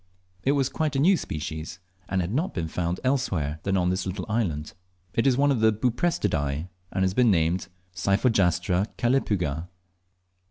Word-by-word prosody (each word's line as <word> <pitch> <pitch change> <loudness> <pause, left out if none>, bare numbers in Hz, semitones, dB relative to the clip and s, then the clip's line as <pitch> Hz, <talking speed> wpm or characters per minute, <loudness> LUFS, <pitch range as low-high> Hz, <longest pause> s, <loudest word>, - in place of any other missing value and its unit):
It 135 - +2
was 135 -3 +2
quite 150 +1 -2
a - - +2
new 185 +7 +5
species, 80 - -5 0.3
and 95 -1 +1
had 90 +4 -3
not 160 +9 -1
been 85 -2 -2
found 85 +2 -2
elsewhere 95 - 0
than 95 -1 0
on 90 -1 +2
this 95 +1 -2
little 90 0 -4
island. 90 -10 -1 0.4
It 115 - +2
is 130 -2 +3
one 145 +1 +4
of 130 - +1
the 110 0 +5
Buprestidae, 105 - 0 0.2
and 95 - 0
has 95 0 +1
been 125 +2 +4
named 85 0 +2 0.3
Cyphogastra 95 -2 +2
calepyga. 90 - 0
95 Hz, 165 wpm, -26 LUFS, 85-125 Hz, 0.4 s, new